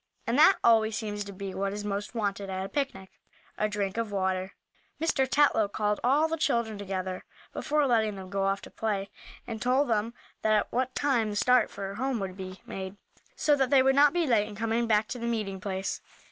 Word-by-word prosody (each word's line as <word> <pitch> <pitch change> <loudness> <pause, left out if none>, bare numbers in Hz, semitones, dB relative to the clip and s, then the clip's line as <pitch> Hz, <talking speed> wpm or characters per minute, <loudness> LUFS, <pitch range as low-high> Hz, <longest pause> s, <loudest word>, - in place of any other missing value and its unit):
And 230 - 0
that 350 +5 +7
always 220 -2 +4
seems 205 -2 -3
to 200 - -7
be 195 0 -6
what 195 0 -2
is 205 0 -5
most 205 +3 -3
wanted 200 -3 -2
at 190 0 -3
a - - -7
picnic 265 -10 -3 0.4
a 215 - 0
drink 205 -1 -2
of 230 -2 -2
water. 190 -1 -1 0.4
Mr. 300 -4 +1
Tetlow 280 -8 +4
called 210 0 0
all 285 +6 +4
the 325 0 -2
children 235 -8 0
together, 185 -2 -4 0.3
before 300 0 +1
letting 220 -5 +2
them 190 -1 -9
go 200 0 -1
off 195 0 0
to - - -11
play, 200 -3 -2 0.3
and 225 -2 -6
told 255 +2 +2
them 225 +1 0 0.3
at 215 -1 +2
what 255 +1 -1
time 245 -7 +1
the 205 - -4
start 250 +4 +4
for 195 0 -6
home 255 +2 -1
would 190 -2 -4
be 185 -1 -8
made, 190 +1 -6 0.4
so 295 - +3
that 265 -3 +1
they 270 -2 +5
would 270 0 +4
not 285 +1 +6
be 345 -1 +1
late 225 -6 +2
in 210 - -9
coming 225 +2 0
back 215 -1 +3
to 250 - -4
the 235 - -3
meeting 210 -5 -2
place. 190 -1 -3
215 Hz, 215 wpm, -28 LUFS, 195-250 Hz, 0.4 s, that